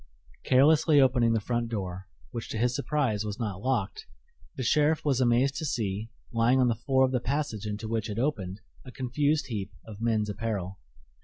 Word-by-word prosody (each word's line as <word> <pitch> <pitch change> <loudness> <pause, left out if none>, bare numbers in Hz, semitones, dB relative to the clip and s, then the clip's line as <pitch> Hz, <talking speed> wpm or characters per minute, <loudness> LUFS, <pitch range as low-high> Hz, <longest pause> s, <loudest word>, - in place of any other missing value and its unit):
Carelessly 145 +3 +5
opening 125 -3 +4
the 115 - +2
front 120 +2 -2
door, 95 -4 -4 0.2
which 115 - -6
to - - -3
his 120 +2 +1
surprise 135 -7 0
was 105 -1 -4
not 105 -5 -4
locked, 120 -5 -2 0.5
the 130 - -3
sheriff 150 +6 +2
was 135 -3 +2
amazed 125 +2 +3
to 160 - -3
see, 110 -5 -2 0.2
lying 115 +3 +3
on 125 -1 +4
the - - +2
floor 130 +3 +2
of 130 - -2
the 125 - +1
passage 125 -5 -2
into 105 +1 -4
which 110 -1 -2
it 105 - -4
opened, 105 -7 -2 0.2
a 130 - -10
confused 145 +4 0
heap 100 -4 -3 0.2
of 110 -1 -10
men's 110 -2 +1
apparel. 105 -3 -4
115 Hz, 185 wpm, -28 LUFS, 105-130 Hz, 0.5 s, Carelessly